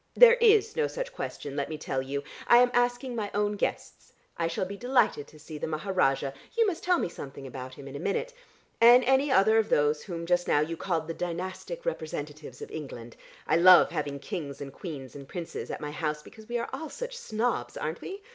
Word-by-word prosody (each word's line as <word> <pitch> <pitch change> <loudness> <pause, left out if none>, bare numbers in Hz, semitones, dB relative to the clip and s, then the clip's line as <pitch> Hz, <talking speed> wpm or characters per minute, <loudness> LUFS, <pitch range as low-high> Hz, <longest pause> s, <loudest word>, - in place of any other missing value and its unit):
There 485 0 +8
is 440 -1 +5
no 465 -1 +1
such - - -5
question, 145 - -6
let 140 -1 -2
me 155 - -4
tell 135 -3 -2
you. 140 +2 -4 0.2
I 240 - +8
am 245 0 +5
asking 245 +1 +1
my 210 -3 -2
own 205 0 +1
guests. 205 - -4 0.2
I 165 - 0
shall 165 +2 -2
be 200 +2 -6
delighted 240 - +1
to 155 - -16
see 155 0 -9
the - - -3
Maharajah 155 -5 0 0.2
(you 460 - +5
must 345 -5 -2
tell 360 -1 +3
me - - 0
something 140 -4 -9
about 130 0 -8
him 140 - -10
in 135 - -8
a - - -5
minute), 200 - -2 0.5
and 240 +2 +8
any 265 +3 +3
other 220 0 +5
of 220 - 0
those 150 +1 +2
whom 170 -3 -6
just 175 0 +1
now 145 - +4
you 160 +3 -1
called 165 -2 -2
the 165 - -3
dynastic 185 - -5
representatives 150 - -5
of - - -10
England. 120 -6 -8 0.3
I - - +3
love 180 +1 +8
having 140 -1 -3
kings 145 -3 -6
and 140 -1 -7
queens 145 -8 -8
and 140 -1 -9
princes 175 -3 -6
at - - -4
my 150 - -4
house, 150 0 -3
because 220 0 -14
we 240 - 0
all 235 - -2
are 315 -1 -5
such - - -6
snobs, 240 - -2
aren't - - -4
we? 395 +1 -7
175 Hz, 220 wpm, -28 LUFS, 150-245 Hz, 0.5 s, There